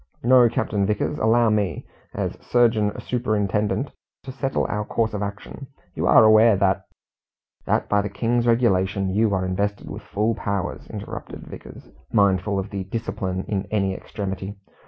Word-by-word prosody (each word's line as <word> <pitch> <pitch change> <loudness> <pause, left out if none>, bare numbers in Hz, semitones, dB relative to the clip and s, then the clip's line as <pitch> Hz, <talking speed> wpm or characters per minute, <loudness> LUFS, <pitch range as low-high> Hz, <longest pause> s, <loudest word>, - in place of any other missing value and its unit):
No, 125 0 +6
Captain 100 -2 -1
Vickers, 105 +1 -1
allow 115 0 +3
me, 100 -7 -1 0.3
as - - -2
surgeon 115 -4 +2
superintendent, 110 +1 -1 0.3
to 135 - -7
settle 135 0 -1
our 105 0 -2
course 110 +1 -1
of 105 - -3
action. 100 +7 -6 0.3
You - - +1
are - - +7
aware 110 0 +6
that 95 0 +1 0.3
" - - -69
" - - -44
That, - - +1
by 105 0 +2
the 100 - -4
King's 120 +4 0
Regulations, 100 -5 +2
you 110 0 +3
are 95 0 -1
invested 100 +2 -2
with - - -7
full 110 +3 -1
powers," 100 -3 -3
interrupted - - -7
Vickers, - - -11 0.2
mindful 100 -1 +2
of 95 +1 -4 0.2
discipline 95 -4 -3
in 95 -2 -2
any 100 -3 0
extremity. 95 0 -5
105 Hz, 155 wpm, -23 LUFS, 100-115 Hz, 0.3 s, are